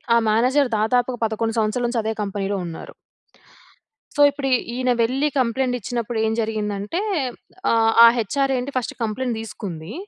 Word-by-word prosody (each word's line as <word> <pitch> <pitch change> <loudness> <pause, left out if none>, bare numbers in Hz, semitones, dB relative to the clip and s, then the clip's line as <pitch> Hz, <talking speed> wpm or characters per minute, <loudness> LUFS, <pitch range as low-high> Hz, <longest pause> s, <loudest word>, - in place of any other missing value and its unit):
ఆ - - +6
మేనేజర్ 250 +5 +3
దాదాపుగా 245 +3 +1
11 225 +1 -2
సంవత్సరాల 220 +3 0
నుంచి 240 -1 -1
అదే 220 +1 -1
కంపెనీలో 200 0 -2
ఉన్నారు. 165 -1 -8 1.2
సో, 290 - +2
ఇప్పుడు 285 -1 -4
ఈ - - +7 0.2
ఈయన 255 0 +1
వెళ్ళి 260 +6 +1
కంప్లైంట్ 255 +1 0
ఇచ్చినప్పుడు 235 +1 -3
ఏం 220 - 0
జరిగిందంటే 210 - -2 0.7
ఆహ్, 225 -1 +3
ఆ - - +11
హెచ్ఆర్‌ 270 +5 0
ఏంటి 250 +3 -3
ఫస్ట్ 250 - -2
కంప్లెయింట్ 230 +2 -2
దీసుకుంది. 190 -7 -7
230 Hz, 150 wpm, -22 LUFS, 215-255 Hz, 1.2 s, ఆ